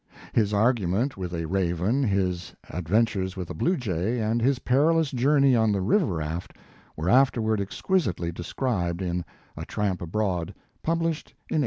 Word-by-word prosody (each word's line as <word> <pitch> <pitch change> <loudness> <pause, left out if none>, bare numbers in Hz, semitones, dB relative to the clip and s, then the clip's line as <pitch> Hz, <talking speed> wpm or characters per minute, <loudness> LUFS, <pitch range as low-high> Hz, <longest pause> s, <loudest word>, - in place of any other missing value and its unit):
His 105 -3 +2
argument 110 +2 +1
with 90 -2 -5
a 85 -1 -3
raven, 95 - 0
his 95 -7 -1 0.2
adventures 95 +2 0
with 90 -2 -5
a - - -3
blue 175 - +1
jay 105 - -1
and 110 +2 0
his 135 +3 +3
perilous 150 +5 +2
journey 135 +1 +4
on 110 -2 +3
the 100 - +1
river 165 - +3
rail, 80 +2 -2 0.6
were 80 +3 -3
afterward 115 -3 +3
exquisitely 100 - -1
described 90 -1 -2
in 90 -1 -2 0.3
"A - - -6
Tramp 100 -3 -2
Abroad," 90 0 -2 0.3
published 165 -1 -1 0.2
in - - +1
1880. - - +3
105 Hz, 155 wpm, -26 LUFS, 90-130 Hz, 0.6 s, journey